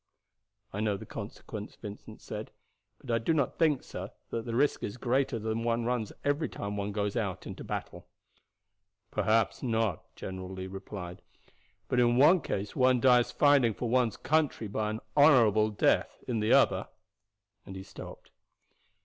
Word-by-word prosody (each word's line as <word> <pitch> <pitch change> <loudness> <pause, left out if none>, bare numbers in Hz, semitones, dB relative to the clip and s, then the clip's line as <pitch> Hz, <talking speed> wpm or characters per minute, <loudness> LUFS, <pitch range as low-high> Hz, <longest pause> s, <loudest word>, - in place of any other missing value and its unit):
"I 105 - -3
know 105 -2 0
the - - -9
consequence," - - -8
Vincent 105 0 -10
said; - - -6 0.5
"but 125 - -5
I 115 - +3
do 160 +9 +1
not 140 -4 0
think, 155 -5 +3
sir, - - -7 0.2
that 115 - -3
the 115 -1 -3
risk 140 +4 +2
is 100 - -4
greater 130 +1 +1
than 110 +1 -2
one 115 0 0
runs 120 -3 -1
every 145 +2 +1
time 100 0 -5
one 100 0 -2
goes 100 0 -2
into 100 -6 -4
battle." - - -6 1.0
"Perhaps 110 +2 +1
not," 115 - -1
General 95 -1 -6
Lee 95 0 -6
replied; 95 -2 -7 0.7
"but 125 - +1
in 120 0 +4
one 155 +6 +6
case 100 -5 -4
one 130 -1 +4
dies 125 -1 +4
fighting 140 -7 +4
for 120 - -3
one's 125 -2 +2
country 150 -7 0
by 105 +1 -2
an 110 +1 -4
honorable 115 -8 +6
death, 105 - +1
in 120 -3 -1
the 105 +1 +1
other - - +4 0.4
" 100 0 -52
and 95 - -8
he 95 - -7
stopped. - - -11
115 Hz, 165 wpm, -30 LUFS, 105-125 Hz, 1.0 s, one